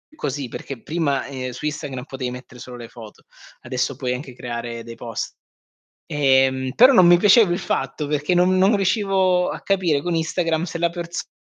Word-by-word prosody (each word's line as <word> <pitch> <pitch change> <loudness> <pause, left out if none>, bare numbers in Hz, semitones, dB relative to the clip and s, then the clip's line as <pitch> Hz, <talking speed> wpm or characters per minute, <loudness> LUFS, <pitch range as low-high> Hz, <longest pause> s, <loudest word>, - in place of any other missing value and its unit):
così, 140 - -3
perché 130 -1 -7
prima, 150 -5 -1
ehm, 130 -2 -5
su 135 - -8
Instagram 145 -4 -4
potevi 130 -3 -5
mettere 125 0 -11
solo 125 0 -9
le 120 -1 -9
foto, 110 -3 -13 0.4
adesso 125 +2 -2
puoi 125 -1 -2
anche 130 +1 -7
creare 120 -1 -5
dei 115 0 -9
post. 115 -2 -6 0.8
Ehm, 130 -2 +2
però 255 +4 +7
non 185 -7 +7
mi 175 0 +7
piaceva 205 +1 +5
il 175 - 0
fatto 135 +3 -2
perché 150 +3 0
non 180 +1 +3
non 195 +3 +4
riuscivo 190 -2 +2
a - - -6
capire 180 -7 +1
con 175 +2 -2
Instagram 165 0 0
se 170 -1 -4
la 170 0 +2
persona 170 0 -6
145 Hz, 185 wpm, -22 LUFS, 130-175 Hz, 0.8 s, però